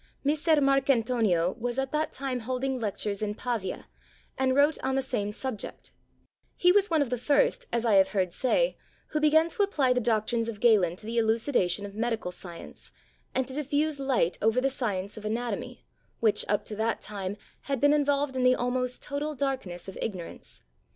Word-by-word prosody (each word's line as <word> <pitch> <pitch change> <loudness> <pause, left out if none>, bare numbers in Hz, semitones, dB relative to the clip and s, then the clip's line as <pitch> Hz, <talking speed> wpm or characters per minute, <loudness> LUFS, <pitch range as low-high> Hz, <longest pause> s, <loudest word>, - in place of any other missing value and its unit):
Messer 305 +3 +3
Marcantonio 240 -10 +2
was 240 +1 -2
at 270 0 -1
that 305 +1 0
time 260 -2 -3
holding 255 +2 -2
lectures 205 -2 -2
in 210 -1 -2
Pavia, 225 -6 -3 0.5
and 260 0 +1
wrote 290 +3 +4
on 265 0 0
the 270 - +1
same 220 -6 -2
subject; 230 -1 -5 0.6
he 360 - +5
was 405 +1 +3
one 320 -3 +3
of 255 - -7
the 250 - -1
first, - - +2
as 235 0 0
I 225 - +3
have 190 0 +6
heard 185 -4 -1
say, - - +1 0.3
who 305 - -1
began 310 +2 +4
to 420 - -2
apply 290 -11 +2
the 250 - +1
doctrines 230 0 0
of 215 -3 -6
Galen 200 -8 +4
to 210 - -13
the 230 +1 0
elucidation 220 -4 +1
of 200 - -8
medical 225 -3 -2
science, 175 -1 -10 0.4
and 260 -1 +1
to 265 - -5
diffuse 295 +1 -1
light 265 -11 +1
over 225 +3 +3
the 270 +1 +1
science 205 -6 -3
of 215 - -8
anatomy, 235 +3 -4 0.3
which, 220 -2 +3
up 205 0 0
to 215 - -6
that 225 +1 0
time, 200 -1 -5 0.3
had 275 -2 0
been 290 +2 +5
involved 285 -2 +1
in 255 - 0
the 255 0 +5
almost 250 0 -2
total 295 +1 -3
darkness 260 -11 -3
of 190 - -8
ignorance. 185 -6 -6
250 Hz, 185 wpm, -28 LUFS, 215-275 Hz, 0.6 s, have